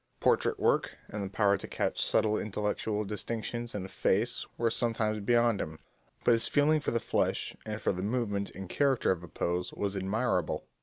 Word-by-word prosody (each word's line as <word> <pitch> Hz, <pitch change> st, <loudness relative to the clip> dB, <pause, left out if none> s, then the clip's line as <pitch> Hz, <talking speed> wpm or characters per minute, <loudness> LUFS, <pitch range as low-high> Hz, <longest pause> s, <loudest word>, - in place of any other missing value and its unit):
Portrait -, -, +2 dB
work -, -, +2 dB
and 105 Hz, -1 st, -4 dB
the 95 Hz, -, -4 dB
power 100 Hz, 0 st, +3 dB
to -, -, -7 dB
catch -, -, -1 dB
subtle 110 Hz, -1 st, +3 dB
intellectual 105 Hz, 0 st, -1 dB
distinctions 115 Hz, +3 st, -4 dB
in 95 Hz, -2 st, -3 dB
a -, -, -6 dB
face 110 Hz, +5 st, 0 dB
were 115 Hz, -1 st, +1 dB
sometimes 110 Hz, -3 st, 0 dB
beyond 115 Hz, 0 st, +3 dB
him, 80 Hz, 0 st, -5 dB, 0.5 s
but -, -, +5 dB
his 115 Hz, -1 st, +4 dB
feeling 150 Hz, +2 st, +3 dB
for 150 Hz, -, -2 dB
the 115 Hz, -, +1 dB
flesh, -, -, 0 dB
and 110 Hz, 0 st, -3 dB
for -, -, +1 dB
the 90 Hz, -, -4 dB
movement 100 Hz, -2 st, -1 dB
and 95 Hz, 0 st, -6 dB
character 135 Hz, +1 st, +2 dB
of 90 Hz, -3 st, -1 dB
a 85 Hz, -, -9 dB
pose, 90 Hz, +2 st, -2 dB
was 100 Hz, -1 st, -2 dB
admirable. 95 Hz, -1 st, 0 dB
105 Hz, 190 wpm, -30 LUFS, 100-115 Hz, 0.5 s, but